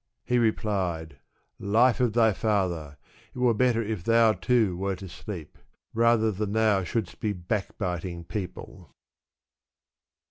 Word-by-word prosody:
He 125 0 +2
replied, 90 - -1 0.4
life 115 +6 +3
of 125 -4 +2
thy 110 -2 +4
father! 90 -9 -1 0.4
it - - -9
were 125 -2 +3
better 115 0 +2
if 105 -5 -4
thou, 115 0 +4
too, 110 -6 +1
wert 95 +1 -3
asleep; 90 -3 -8 0.3
rather 115 -1 +3
than 105 +1 -3
thou 110 -3 +3
shouldst 100 +1 -3
be 105 -1 -1
backbiting 90 -2 -3
peo 95 +2 -3
ple." - - -13
105 Hz, 130 wpm, -27 LUFS, 90-115 Hz, 0.4 s, thy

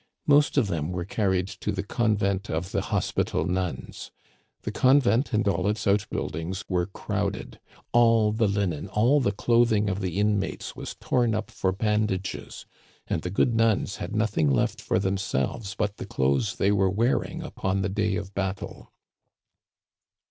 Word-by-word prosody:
Most 145 0 +4
of 130 - +4
them 85 -4 -2
were 90 -1 -3
carried 95 -2 0
to - - -4
the 95 0 -3
Convent 100 -3 0
of 85 +4 -3
the - - 0
Hospital - - -1
Nuns. 90 -1 -3 0.5
The - - -3
con 130 +2 +5
vent 120 +2 +1
and 110 -2 +1
all 90 -1 +1
its 105 +1 -1
outbuildings 95 -2 -1
were 90 -2 0
crowded. 100 - -4 0.3
All 115 -3 +4
the 110 0 +1
linen, 100 -5 -1
all 115 +9 +3
the 120 -7 +1
clothing 110 -1 +2
of 95 - -3
the 90 -1 -3
inmates 105 -1 -1
was - - -7
torn 120 -3 +1
up 110 - -4
for 95 - 0
bandages, 105 -1 -2 0.4
and - - -2
the 90 - -4
good 110 +6 +2
nuns 115 -3 +1
had 110 - -5
nothing 105 -9 +1
left 65 - +1
for - - 0
them 95 0 0
selves 95 - -2
but 105 -1 -2
the - - -7
clothes 70 +9 0
they 100 - +2
were 95 -2 +3
wearing 115 +7 0
upon 95 0 -2
the - - +1
day 105 0 0
of 100 0 -5
battle. 95 0 -4
100 Hz, 165 wpm, -26 LUFS, 95-110 Hz, 0.5 s, con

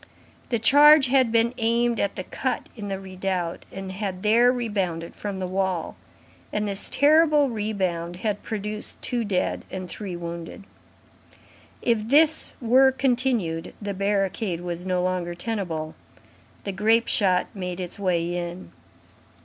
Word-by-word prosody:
The 235 - +1
charge 285 +4 +7
had 260 -3 +3
been 230 +1 +2
aimed 235 0 +1
at 200 - -1
the 185 - -4
cut 255 +6 -3
in 210 -3 -7
the 195 -1 -3
redoubt, 185 -2 -4
and 195 0 -7
had 190 -1 -5
there 235 +3 +5
rebounded 195 -9 -3
from 200 -2 -5
the 190 - -3
wall; 185 -2 -2 0.6
and 210 0 -1
this 200 0 0
terrible 300 -1 +4
rebound 190 -6 -2
had 205 +2 -3
produced 210 0 -5
two 245 -2 -1
dead 195 -4 -1
and 185 -1 -6
three 190 0 -6
wounded. 170 +2 -7 1.2
If 225 -3 +1
this 310 +4 +4
were 260 +3 +5
continued, 245 -10 0
the 205 -1 -4
barricade 195 -2 -1
was 175 +1 -5
no 180 -1 0
longer 180 -1 -2
tenable. 175 -6 -4 0.7
The 200 - -3
grape 220 +4 +2
shot 185 -4 +3
made 180 -3 -5
its 180 +1 -6
way 175 -3 0
in. 175 +1 -6
200 Hz, 140 wpm, -24 LUFS, 180-235 Hz, 1.2 s, charge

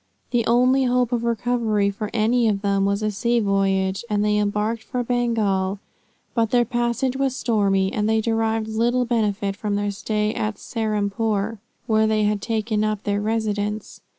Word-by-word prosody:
The 240 -2 +1
only 255 +3 +4
hope 250 -1 +1
of 235 -1 0
recovery 230 -3 +1
for 205 +1 -5
any 235 +1 +2
of 205 -2 0
them 200 -1 +2
was 200 +1 0
a 215 - +1
sea 235 +4 +1
voyage, 195 -1 +1
and 210 0 +1
they 210 0 +2
embarked 210 +2 -1
for 245 +2 -3
Bengal, 220 -6 0 0.6
but 225 -2 +1
their 240 0 +3
passage 240 +1 -1
was 270 -1 0
stormy, 200 -6 +1
and 210 0 0
they 220 0 +3
derived 225 0 0
little 240 +3 +1
benefit 210 -4 0
from 205 0 -2
their 205 0 -1
stay 210 +1 -1
at 215 0 -2
Serampore, 215 -1 -1 0.3
where 220 -2 +3
they 215 -1 +2
had 210 -1 +1
taken 220 -1 -1
up 215 -1 -1
their 205 0 -1
residence. 210 -1 -2
215 Hz, 170 wpm, -22 LUFS, 205-235 Hz, 0.6 s, only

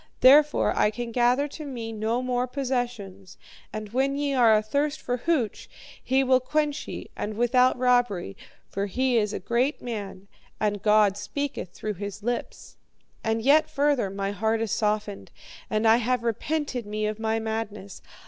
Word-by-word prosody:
Therefore, 290 +3 +6
I - - +3
can 235 +2 -5
gather 245 +4 +2
to 305 - -8
me 240 -6 -5
no 225 +3 -1
more 250 0 0
possessions, 245 -8 -4 0.3
and 215 -1 -6
when 265 +4 0
ye 285 0 -1
are 235 -4 +5
athirst 285 +8 0
for 245 0 -2
hooch, 255 -6 -1 0.3
he 265 +1 +2
will 260 -1 +4
quench 300 +3 -1
ye - - -7
and 210 0 -4
without 250 +2 +3
robbery. 245 - +1 0.3
For 200 +1 -3
he 255 +5 0
is 210 -2 +1
a - - -3
great 240 - 0
man, 200 -5 -6 0.3
and 205 -2 0
God 210 -2 +4
speaketh 280 -7 -4
through 215 - -4
his 200 0 -6
lips. 240 +1 -4 0.5
"'And 225 0 -1
yet 295 +4 +4
further, 280 -7 +1
my 195 0 -3
heart 220 +3 0
is 225 -3 -2
softened, 210 -1 -1 0.4
and 215 +1 +1
I 225 +1 +6
have 245 0 0
repented 250 +1 -2
me 215 +1 -2
of 215 0 -3
my 220 0 0
madness. 220 -3 -5
230 Hz, 165 wpm, -26 LUFS, 210-255 Hz, 0.5 s, Therefore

